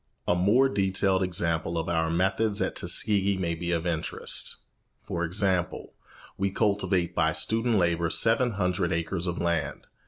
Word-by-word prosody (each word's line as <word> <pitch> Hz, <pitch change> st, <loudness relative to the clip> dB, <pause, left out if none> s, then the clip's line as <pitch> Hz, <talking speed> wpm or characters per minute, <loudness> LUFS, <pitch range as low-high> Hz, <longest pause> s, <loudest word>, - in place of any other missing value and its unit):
A -, -, +3 dB
more 105 Hz, +10 st, +3 dB
detailed 95 Hz, -4 st, +1 dB
example 85 Hz, -2 st, 0 dB
of 80 Hz, -, -2 dB
our 80 Hz, -1 st, 0 dB
methods 95 Hz, +5 st, 0 dB
at -, -, -1 dB
Tuskegee 100 Hz, -2 st, +2 dB
may 85 Hz, -3 st, -1 dB
be 85 Hz, +1 st, -5 dB
of 85 Hz, 0 st, -1 dB
interest. 85 Hz, -3 st, -1 dB, 0.5 s
For 85 Hz, 0 st, -3 dB
example, 90 Hz, +1 st, -1 dB, 0.5 s
we 100 Hz, 0 st, +1 dB
cultivate 95 Hz, -4 st, 0 dB
by -, -, +1 dB
student 115 Hz, +1 st, +1 dB
labour 85 Hz, -2 st, +1 dB
seven 115 Hz, +6 st, +2 dB
hundred 90 Hz, -2 st, -1 dB
acres 85 Hz, +1 st, -2 dB
of 90 Hz, -, -3 dB
land. 85 Hz, -5 st, -2 dB
90 Hz, 150 wpm, -27 LUFS, 85-100 Hz, 0.5 s, A